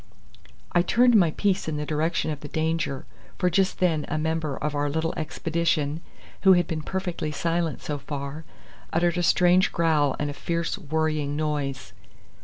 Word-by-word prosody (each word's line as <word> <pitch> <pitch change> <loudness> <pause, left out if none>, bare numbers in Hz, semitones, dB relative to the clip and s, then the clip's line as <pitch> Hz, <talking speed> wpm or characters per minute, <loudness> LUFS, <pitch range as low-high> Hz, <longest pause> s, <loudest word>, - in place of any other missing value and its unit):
I 175 - +4
turned 240 +6 +4
my 180 -6 +6
piece 195 +3 0
in 155 -2 -2
the 150 - -3
direction 155 +1 0
of 150 - -5
the 150 - -8
danger, 160 -3 -1 0.3
for 180 -1 +1
just 190 +2 +2
then 165 -5 +1
a 155 - -2
member 160 -2 -1
of 150 0 -2
our 145 0 0
little 160 +2 -1
expedition, 160 -1 -1 0.4
who 190 -1 +7
had 175 -1 +3
been 160 -3 -3
perfectly 180 -2 -3
silent 165 0 -1
so 145 -1 -3
far, 140 +2 -5 0.5
uttered 175 +1 +1
a - - +1
savage 180 +2 +4
growl 155 -5 +2
and 145 0 -2
a - - -7
fierce 170 +2 -2
worrying 155 -3 -1
noise. 145 -3 -2
160 Hz, 170 wpm, -25 LUFS, 150-175 Hz, 0.5 s, who